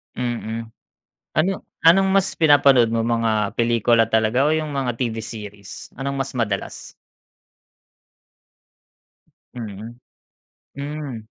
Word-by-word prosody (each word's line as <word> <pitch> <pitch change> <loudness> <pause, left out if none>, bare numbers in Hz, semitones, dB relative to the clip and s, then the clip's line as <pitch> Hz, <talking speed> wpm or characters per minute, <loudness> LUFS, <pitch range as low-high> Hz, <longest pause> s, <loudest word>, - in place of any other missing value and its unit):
Mm. 115 -2 -4 0.7
Ano 160 +5 +2 0.3
anong 190 +4 +6
mas 195 -1 +3
pinapanood 140 -6 +5
mo? 115 - +1
Mga 115 -3 0
pelikula 115 0 +3
talaga 110 +5 +2
o 155 - +2
yung 155 -1 -2
mga 130 -4 -1
TV 115 -3 -2
series? 105 -3 -9
Anong 140 +1 -3
mas 135 0 -2
madalas? 105 -5 -3 2.6
Mm. 115 0 -8 0.8
Hmm. 145 -2 -5
120 Hz, 100 wpm, -22 LUFS, 110-140 Hz, 2.6 s, anong